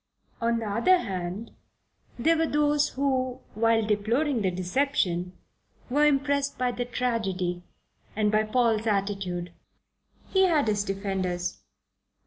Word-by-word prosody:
On 230 0 +2
the 225 -1 -3
other 235 - +4
hand, 190 - -4 0.7
there 320 +8 +3
were 325 0 +1
those 295 -1 +2
who, 260 -2 0
while 225 0 +2
deploring 230 +6 +1
the 190 - +2
deception, 180 -2 -1 0.5
were 295 +3 +4
impressed 280 0 +1
by 250 0 +1
the 245 0 -3
tragedy 195 -8 -2 0.5
and 210 -1 +2
by 215 0 +3
Paul's 225 0 +1
attitude. 195 -4 -2 0.8
He 380 -1 +4
had 305 -7 +2
his 205 -1 +1
defenders. 190 -3 -3
225 Hz, 120 wpm, -27 LUFS, 195-275 Hz, 0.8 s, other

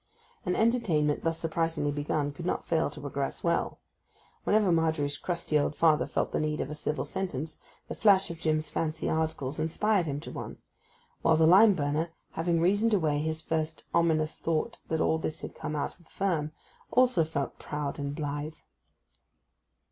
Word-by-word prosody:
An 180 - +1
entertainment 180 -11 +2
thus 165 0 0
surprisingly 165 -2 -1
begun 145 0 -1
could 170 +4 -9
not 180 - -1
fail 165 -3 +1
to 145 - -11
progress 140 -1 -4
well. 170 0 0 0.7
Whenever 210 -3 +4
Margery's 160 -3 +1
crusty 170 -3 -1
old 145 +1 0
father 155 -2 +3
felt - - -1
the - - 0
need 155 0 -1
of 140 - -3
a - - -3
civil 150 0 -2
sentence, 160 -5 -4 0.3
the - - -4
flash 195 -4 +4
of 165 - -8
Jim's 155 -1 0
fancy 160 +1 -2
articles 155 -3 -1
inspired 180 +3 +1
him 140 -1 -2
to - - -8
one; - - -6 0.6
while 160 -1 +4
the 160 - +5
lime 195 +5 +7
burner, 150 +2 0 0.2
having 165 +1 0
reasoned 205 +6 +3
away 155 -6 +1
his 160 +1 -2
first 160 0 -2
ominous 160 -2 +2
thought 165 +8 -1
that 160 0 0
all 160 - +2
this 155 -1 -3
had - - -6
come 155 -1 -5
out 145 - -1
of 170 - -21
the - - -25
firm, 165 -6 -1 0.4
also 250 -9 +4
felt 150 -3 -3
proud 150 -1 -4
and 140 0 -3
blithe. 145 +1 -3
160 Hz, 175 wpm, -29 LUFS, 150-170 Hz, 0.7 s, lime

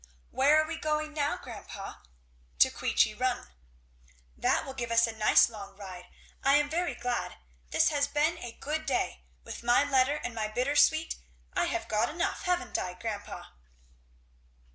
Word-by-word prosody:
"Where 285 +4 +5
are 310 - +2
we 325 0 -4
going 305 -1 -1
now, 295 -1 0
grandpa?" - - -8 0.6
"To - - +6
Queechy - - +2
Run." - - -1 0.9
"That - - +1
will 270 - -6
give 240 -3 -4
us 230 0 +5
a 230 - -3
nice 215 -1 +5
long 200 -3 -10
ride. 185 -3 -9 0.4
I 275 +1 +5
am 295 0 +2
very 350 +2 -1
glad. 245 0 -2 0.3
This - - +3
has 285 -2 +1
been 310 +4 +1
a 240 -1 -7
good 310 +2 -3
day. 250 - -1 0.2
With - - -8
my 240 +3 +4
letter 275 0 +3
and 245 - -5
my 220 -1 -2
bittersweet 285 +7 +2 0.4
I - - +1
have - - -2
got 215 +2 +1
enough, 345 +4 -2
haven't 360 0 0
I, 180 -1 -4
grandpa?" 205 0 -6
270 Hz, 165 wpm, -29 LUFS, 230-305 Hz, 0.9 s, To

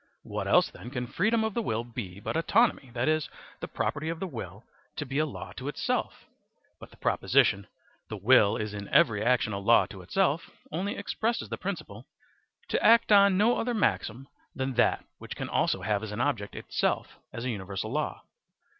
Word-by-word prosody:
What - - -4
else - - +4
then 120 - -10
can 125 -2 -3
freedom 220 - +1
of 220 -1 -1
the 235 - 0
will 115 - -1
be 110 -6 -7
but 105 - -4
autonomy, 180 - +2
that 120 +3 0
is, 155 -1 +1 0.3
the - - -5
property 155 +3 -2
of 165 0 -4
the 190 - -2
will 110 - -7 0.3
to 145 - -4
be 135 +2 -2
a 155 - +2
law 140 - -8
to - - -6
itself? - - -2 0.5
But - - -11
the - - -19
proposition: 100 0 +2 0.4
"The 110 - -5
will 105 0 +5
is 105 -1 -4
in 100 -1 -6
every 105 -2 +3
action 120 -3 +2
a 100 - -2
law 115 +4 +5
to 95 - -9
itself," 165 - 0 0.2
only 185 +6 -2
expresses 225 +3 -2
the - - -4
principle: - - -6 0.6
"To - - 0
act 230 -1 +6
on 200 -2 +6
no 225 +4 +3
other 240 +1 -1
maxim 135 - -1 0.3
than 130 0 -2
that 120 - +2
which - - -8
can - - -5
also - - 0
have 105 -2 0
as 110 -1 -6
an 105 - -5
object 120 -6 -1
itself - - -2
as 115 - -6
a 130 - 0
universal 100 +1 -5
law." 150 +3 -2
130 Hz, 195 wpm, -28 LUFS, 105-180 Hz, 0.6 s, act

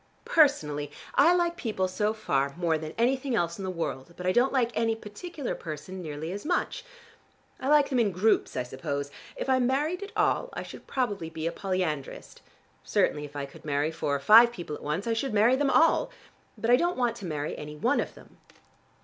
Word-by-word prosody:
Personally 150 - +3 0.2
I 335 +5 +5
like 345 -1 +1
people 215 - -1
so 210 +3 0
far 140 -10 -1
more 170 -2 +1
than 155 0 -5
anything 260 +2 +1
else 170 -3 -1
in - - -5
the 190 - -2
world, 170 -3 -4
but 180 - -6
I 185 - +3
don't 245 +7 +3
like 245 -3 +1
any 225 0 +1
particular 260 - -6
person 170 +4 -7
nearly 155 0 -5
as 200 +2 -5
much. 350 +3 -1 0.8
I 260 - -4
like 295 -1 +5
them 260 -3 +1
in 215 -4 +2
groups 200 +5 +1
I - - 0
suppose. 140 +3 -4 0.2
If - - -4
I 260 -1 +3
married 285 +8 0
at 400 +1 -7
all, 425 +4 +2
I - - -4
should - - -11
probably 205 -11 -2
be 160 -1 -6
a 165 - 0
polyandrist. 180 -8 -3 0.4
Certainly 150 0 +1
if 145 0 -13
I 140 -1 -3
could 140 - -15
marry 145 +1 0
four 155 -3 -1
or - - -1
five 225 +10 +8
people 175 -9 -6
at - - -11
once, 150 +7 -2
I 230 - +1
should 225 0 -2
marry 225 +5 +5
them 275 +1 +1
all. 325 +4 +4 0.5
But 230 - 0
I 245 - +7
don't 345 +5 0
want 245 -2 +1
to 200 - -8
marry 150 -3 -3
any 150 0 -8
one 150 - +1
of - - -3
them." - - -17
200 Hz, 210 wpm, -28 LUFS, 155-260 Hz, 0.8 s, five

